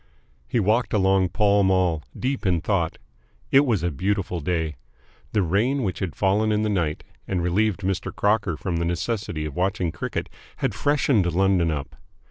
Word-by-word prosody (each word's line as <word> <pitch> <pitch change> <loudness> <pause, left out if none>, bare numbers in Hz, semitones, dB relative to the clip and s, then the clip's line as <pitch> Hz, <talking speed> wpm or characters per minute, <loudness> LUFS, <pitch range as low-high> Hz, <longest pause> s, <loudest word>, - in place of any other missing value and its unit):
He 120 - 0
walked 110 +4 +1
along 95 -2 +3
Pall 100 +2 +3
Mall, 95 -4 +2 0.2
deep 135 +1 -1
in 90 -2 +2
thought. 85 -2 -1 0.5
It 140 +1 +5
was 105 -9 +1
a 85 - 0
beautiful 95 +2 -1
day. 80 -2 -2 0.5
The 105 -3 +2
rain 115 - +1
which 90 -6 -2
had 90 -6 -3
fallen 105 +3 +2
in 105 0 +1
the 110 - 0
night 85 -7 -1 0.2
and 90 -3 -1
relieved 100 +3 +1
Mr. 95 -1 -2
Crocker 100 -5 +1
from 85 0 -2
the 85 - 0
necessity 85 -2 -2
of 75 -3 -6
watching 95 -2 0
cricket - - -4 0.3
had - - -1
freshened 135 -10 +2
London 95 -1 +2
up. 75 -3 -4
95 Hz, 170 wpm, -24 LUFS, 85-105 Hz, 0.5 s, It